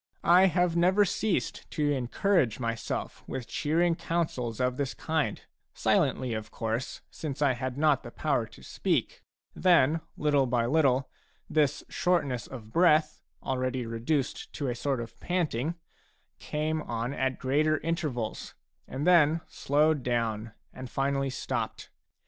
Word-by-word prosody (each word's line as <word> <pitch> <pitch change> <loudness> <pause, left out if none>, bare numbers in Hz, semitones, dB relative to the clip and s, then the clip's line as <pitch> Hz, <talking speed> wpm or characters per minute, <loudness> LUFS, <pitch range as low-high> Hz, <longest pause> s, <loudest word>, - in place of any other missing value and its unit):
I 180 +3 +7
have 175 -1 +1
never 185 +4 +4
ceased 200 +1 -1
to 150 -2 0
encourage 135 - +1
myself 115 -2 -3
with 130 - -4
cheering 165 +8 +1
counsels 155 -10 -2
of 125 0 0
this 140 -2 -2
kind, 155 -9 -1 0.4
silently, 125 -3 +1
of 110 -1 -4
course, 115 +3 -3
since 145 -3 -5
I 145 -3 +3
had 130 +1 -4
not 150 -2 +3
the 120 - -9
power 135 -3 0
to 110 - -16
speak; - - -1 0.3
then 165 -3 +4 0.2
little 145 -3 +2
by 120 -1 +1
little 135 -1 +3 0.4
this 150 -2 +1
shortness 155 -9 0
of 110 -4 -10
breath, 155 -3 +4 0.2
already 130 -1 -1
reduced 120 +5 -2
to 140 -4 -2
a - - 0
sort 130 0 -1
of 115 0 -9
panting, 165 -4 -1 0.6
came 155 +1 -2
on 120 0 -3
at 130 -1 -1
greater 150 +4 +2
intervals, 150 - -3 0.3
and 140 +3 -4
then 165 -2 +5
slowed 150 +1 +2
down 115 -3 -1 0.2
and 130 -1 -8
finally 135 +1 0
stopped. 130 - -4
140 Hz, 135 wpm, -29 LUFS, 125-160 Hz, 0.6 s, I